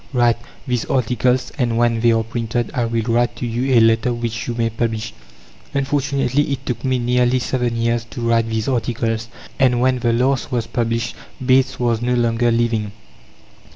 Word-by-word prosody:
Write 120 -2 +3 0.3
these 125 -3 -1
articles, 125 0 +1
and 120 -3 +1
when 120 -1 +2
they 120 +1 +4
are 115 0 +2
printed, 115 +1 -3
I 120 -5 0
will 115 -1 -1
write 120 +1 +1
to - - -4
you 125 +3 0
a - - +8
letter 115 +2 +3
which 115 -1 -3
you 120 - -2
may 115 -1 0
publish." 110 -1 -2 0.6
Unfortunately, 140 0 0
it 135 0 -3
took 125 - -3
me 130 -1 +1
nearly 125 +1 +2
seven 125 -1 -1
years 115 0 0
to 120 +1 -8
write 115 -1 +2
these 110 -1 -2
articles, 115 -2 -1 0.3
and 125 -2 +3
when 130 0 +2
the 120 -1 +1
last 130 +4 +1
was 120 -3 0
published, 115 -1 -2 0.3
Bates 130 0 +3
was 120 -2 +1
no 125 +1 +1
longer 120 0 +2
living. 115 -3 0
120 Hz, 180 wpm, -20 LUFS, 115-125 Hz, 0.6 s, a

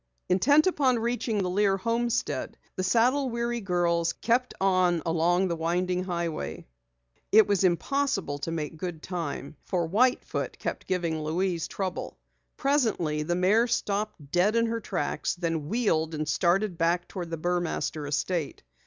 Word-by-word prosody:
Intent 285 +12 +5
upon 275 -9 +2
reaching 235 -1 -1
the 180 - -1
Lear 195 0 +2
homestead, 235 +3 -1 0.2
the - - -2
saddle 245 +8 +2
weary 235 0 -2
girls 170 -3 +1
kept 245 +2 0
on 185 -4 +2
along 170 +3 +2
the 170 - -1
winding 180 +3 0
highway. 170 -3 -3 0.7
It 215 +1 +7
was 200 -2 +1
impossible 190 - 0
to 155 - -4
make 160 -1 -4
good 175 -2 -5
time 160 -5 -5
for 175 -3 -1
White 245 +9 +2
Foot - - -4
kept - - -5
giving 170 -4 -1
Louise 165 +2 -1
trouble. 190 -2 -4 0.4
Presently 220 - +1
the 175 +3 -1
mare 205 +7 +3
stopped 205 - -2
dead 185 +6 +3
in 230 0 +3
her 230 0 -1
tracks, 195 -4 -2
then 165 -4 -2
wheeled 165 -8 +1
and 155 0 -3
started 175 +4 +1
back 170 +2 +1
toward 175 -3 -6
the 165 - -3
Burmaster 175 -3 -2
estate. 150 - -2
180 Hz, 150 wpm, -27 LUFS, 165-225 Hz, 0.7 s, It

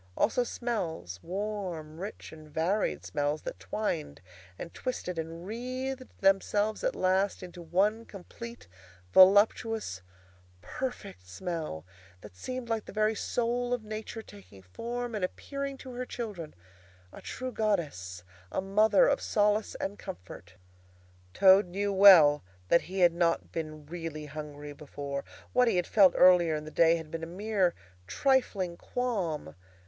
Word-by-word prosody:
Also 245 +3 +2
smells—warm, 180 - -4
rich, 200 +4 -7
and 155 -1 -13
varied 160 - 0
smells—that 145 +2 -2
twined 150 - -3 0.4
and 170 - -8
twisted 180 -9 -4
and 165 +2 -6
wreathed 255 +4 -4
themselves 205 +2 +2
at - - 0
last 190 +2 +1
into 180 -1 -9
one 195 +7 +1
complete, 235 +4 -10 0.5
voluptuous, 205 - +5 0.6
perfect 200 - -6
smell 155 - -5 0.4
that - - -13
seemed 255 - -5
like 225 -2 -2
the - - -9
very 215 +1 +2
soul 245 +3 -1
of 235 - -9
Nature 215 +1 -6
taking 195 - -15
form 235 - -5
and 210 -3 -3
appearing 275 +8 -4
to 260 - -10
her 250 +1 -3
children, 205 -10 -6 0.6
a - - -10
true 255 0 -5
Goddess, 145 - -2 0.3
a - - -1
mother 210 - +4
of - - +1
solace 210 0 +1
and 200 +1 -4
comfort. 90 0 -10 0.8
Toad 190 - +6
now - - -15
knew 200 +1 0
well 180 -7 +8 0.3
that 170 - +5
he 190 0 -2
had 175 -1 +6
not 170 -1 0
been 155 -2 -5
really 160 -1 -6
hungry 150 0 -8
before. 140 -1 -6 0.3
What 250 0 +4
he 225 - +2
had 180 -1 +1
felt 190 -5 +5
earlier 175 -3 +6
in 150 0 -5
the 155 - -8
day 165 +1 +5
had 160 -2 -7
been 165 - -4
a 165 - -5
mere 190 0 0 0.3
trifling 200 - +1
qualm. 185 - -3
190 Hz, 140 wpm, -29 LUFS, 155-220 Hz, 0.8 s, well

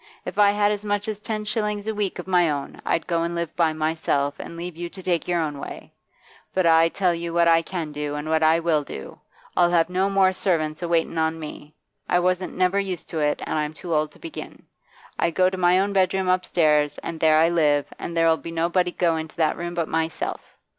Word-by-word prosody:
If - - -5
I 205 -1 +7
had 205 0 +2
as 210 0 -3
much 205 +1 -1
as 215 -2 -3
ten 215 0 -4
shillings 210 -1 -1
a 220 - -1
week 205 -3 -2
of 180 - -6
my 180 -3 +3
own, 140 -2 -4
I'd - - 0
go 170 -2 0
and 170 +1 -2
live 170 -1 -3
by 165 -2 +3
myself, 155 -2 0
and 170 - -8
leave 175 0 -6
you 175 +1 -5
to 190 +1 -11
take 175 -3 0
your 175 -1 +1
own 150 -3 -2
way. - - -9 0.6
But 185 -1 +2
I 165 0 +5
tell 180 0 +1
you 170 0 -4
what 170 0 +4
I 165 0 +5
can 165 -3 -5
do, 145 0 -4
and 150 +1 -5
what 160 0 +1
I 160 +1 +4
will. 160 -3 +1 0.7
I'll 175 -1 +4
have 170 0 +2
no 190 +2 +1
more 195 -1 +3
servants 155 -5 -1
a 175 - -2
waitin' 170 -1 0
on 160 0 0
me; 150 -1 -9 0.3
I 180 - +3
wasn't 180 +1 0
never 185 +2 +2
used 190 -4 -4
to 165 - -3
it, 150 -1 0
and - - -1
I'm 150 +1 -3
too 170 +2 -5
old 155 0 +1
to - - -18
begin. 335 -2 -9 0.5
I 170 - +2
go 185 +2 +2
to - - -3
my 180 +1 +4
own 200 +1 0
bedroom 190 0 +2
upstairs, 155 -5 +2
and 165 -1 -5
there 155 -1 +4
I 165 +1 +5
live, 150 -4 +2
and 170 - -5
there 165 0 +4
'll 160 0 +4
be - - -7
nobody 175 +2 +1
go 170 -2 +1
into 160 0 -6
that 160 -3 +1
room 175 0 -5
but 170 -2 -1
myself. 160 0 -2
170 Hz, 235 wpm, -24 LUFS, 160-185 Hz, 0.7 s, I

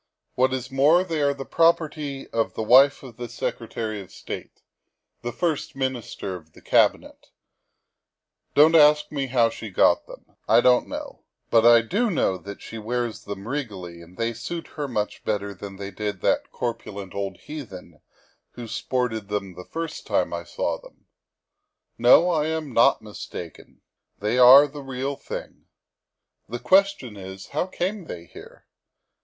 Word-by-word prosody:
What 130 +1 +2
is 130 -1 -4
more, 150 +7 +4
they 165 -4 -2
are 140 0 +3
the 135 -1 -6
property 155 -4 +1
of 115 -1 -1
the 110 - -2
wife 135 +6 +6
of 120 -4 -11
the 120 -1 -6
Secretary 110 -2 -4
of 95 - -13
State - - -8 0.6
(the 120 - -4
First 160 +2 -2
Minister 130 -7 -3
of 80 -3 -13
the - - -17
Cabinet - - +1 0.6
). - - -54
Don't 155 +3 +7
ask 150 -2 +5
me 140 -2 -2
how 120 -3 +3
she 110 - -8
got 90 - +3
them. - - -12 0.2
I - - +6
don't 125 0 +4
know. - - -7 0.3
But 115 0 +6
I 120 -1 +8
do 215 - 0
know 95 - 0
she 115 - -9
wears 120 +1 -3
them 100 +1 -7
regally 100 -11 -5
and 85 +2 -16
they 115 0 -1
suit 145 +9 -6
her 150 -2 -4
much 105 -5 -3
better 100 -1 -2
than 100 +1 -9
they 100 0 -7
did 105 -3 -4
that - - +1
corpulent 100 -5 -5
old 100 -1 -4
heathen 95 - -10 0.5
who 120 - -8
sported 115 -3 -2
them 100 -2 -3
the 90 +1 -10
first 165 -1 -5
time - - 0
I - - -4
saw - - -3
them. - - -18 0.9
No, 175 - +7
I 155 -2 +1
am 160 -4 -3
not 115 - +4
mistaken. 95 -5 -9 0.4
They 105 +5 0
are 130 +3 +10
the 145 0 -8
real 135 +1 -4
thing. - - -8 0.8
The 120 - -3
question 190 - +2
is, 95 0 -9
how 155 +5 -1
came 190 +1 -3
they 85 - -8
here? - - -14
125 Hz, 160 wpm, -24 LUFS, 105-145 Hz, 0.9 s, are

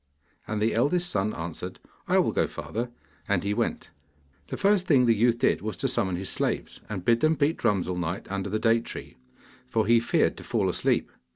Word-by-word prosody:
And 110 -1 -2
the 110 +2 +1
eldest 170 +10 +1
son 100 +2 0
answered, 85 +2 -6 0.3
'I - - +3
will - - +3
go, - - +1
father,' 120 +2 -4 0.4
and 100 -4 +1
he 100 +1 0
went. - - -2 0.6
The - - -5
first 195 -2 +2
thing 130 -5 +5
the 115 - +5
youth 115 +2 +3
did 130 - +2
was 110 0 -4
to 135 - 0
summon 95 -8 0
his 95 +2 -4
slaves, - - -2
and 95 -4 -5
bid 115 -1 +4
them 155 +3 +3
beat 150 +2 +1
drums 95 -4 +1
all 90 -1 -2
night 90 +2 -3
under 100 0 -2
the 110 - 0
date 115 +1 +2
tree, - - -7 0.5
for 110 -1 +1
he 115 +2 +5
feared 115 - +1
to - - -8
fall - - 0
asleep. - - 0
110 Hz, 210 wpm, -27 LUFS, 95-125 Hz, 0.6 s, thing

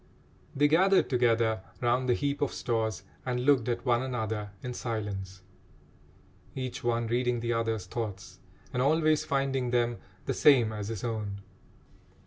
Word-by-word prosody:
They 145 +2 +4
gathered 190 +5 +4
together 115 -4 +2 0.2
round 125 +1 +1
the 120 - +4
heap 140 +1 -2
of 145 - +1
stores 110 -4 -1 0.2
and 125 -1 -2
looked 135 -5 +4
at 120 - -2
one 120 -1 +3
another 110 -5 -3
in 125 -1 -4
silence, 100 -6 -4 1.1
each 130 -2 -4
one 120 -1 +1
reading 120 +1 0
the 120 0 -1
other's 115 -4 -1
thoughts 100 -2 -6 0.3
and 125 - 0
always 155 +2 +3
finding 135 -3 0
them 120 -1 +1 0.3
the - - 0
same 120 -7 +5
as 105 -1 -4
his 110 -3 -5
own. 105 -4 -3
120 Hz, 145 wpm, -29 LUFS, 110-130 Hz, 1.1 s, same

